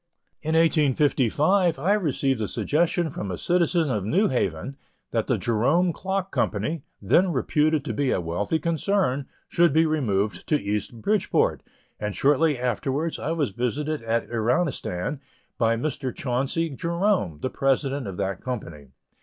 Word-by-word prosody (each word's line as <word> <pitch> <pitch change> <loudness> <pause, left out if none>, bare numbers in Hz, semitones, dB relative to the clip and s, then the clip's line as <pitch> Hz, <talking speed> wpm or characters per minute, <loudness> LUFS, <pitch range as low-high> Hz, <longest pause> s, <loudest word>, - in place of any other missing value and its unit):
In 160 0 -1
1855, 155 - +3
I 175 +9 +2
received 140 - 0
a 105 - -1
suggestion 160 - 0
from 100 - -5
a 90 - -3
citizen 170 -3 +1
of 105 -5 -1
New 180 - +2
Haven, 110 0 -2 0.4
that - - 0
the - - +2
Jerome 140 +11 +2
Clock 190 +1 -3
Company, 125 +10 -1 0.2
then 170 - +3
reputed 150 +1 +1
to - - -2
be 140 -2 0
a - - +1
wealthy 85 - -1
concern, 160 -4 0 0.2
should 170 -2 +3
be 160 +1 +4
removed 110 -10 -1
to 150 - +2
East 105 +2 -3
Bridgeport, 210 -2 +1 0.4
and 105 -1 -3
shortly 145 +1 +3
afterwards 130 +6 -1
I 160 - -2
was 145 -9 0
visited 145 +7 -2
at 115 0 -1
Iranistan 120 - -1 0.4
by 115 -1 +3
Mr. 135 0 -2
Chauncey 135 +6 -1
Jerome, 170 - 0
the 130 - -1
President 135 -1 0
of 95 -2 -6
that 95 -1 -2
company. 85 - -6
140 Hz, 145 wpm, -25 LUFS, 115-165 Hz, 0.4 s, be